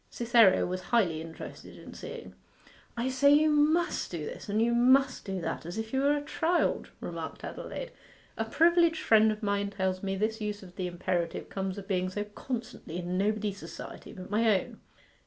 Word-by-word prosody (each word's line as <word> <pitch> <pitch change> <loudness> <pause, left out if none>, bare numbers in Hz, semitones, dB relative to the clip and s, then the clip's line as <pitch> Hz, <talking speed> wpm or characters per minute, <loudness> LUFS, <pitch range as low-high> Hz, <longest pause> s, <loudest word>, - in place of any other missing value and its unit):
Cytherea 235 -5 +4
was 185 +1 -3
highly 180 -10 +2
interested 165 0 -9
in - - -11
seeing. 470 -1 -8 0.6
'I 240 +2 0
say 275 +2 +4
you 305 +1 +5
must 310 +3 +2
do 165 -4 -4
this, - - -8
and 210 +2 +1
you 235 +1 +3
must 255 +2 +4
do 190 -2 -3
that, - - -3
as 175 +5 -6
if 220 +1 -4
you 265 - +2
were 285 +1 +3
a 290 - -5
child,' 330 +3 0
remarked - - -6
Adelaide. - - -6 0.4
'A 225 - -2
privileged 335 +5 +3
friend 220 0 +5
of 215 +1 -6
mine 200 0 0
tells 190 -2 -1
me 195 -1 -2
this 220 +3 -1
use 210 -1 -3
of 180 -1 -13
the 185 -2 -2
imperative 175 -1 -2
comes 190 0 -3
of 195 -1 -8
being 185 -2 0
so 205 +2 -3
constantly 225 -4 -6
in 180 0 -3
nobody's 205 0 0
society - - -9
but 185 +1 -10
my 215 -2 +4
own. - - -12
215 Hz, 190 wpm, -29 LUFS, 190-260 Hz, 0.6 s, you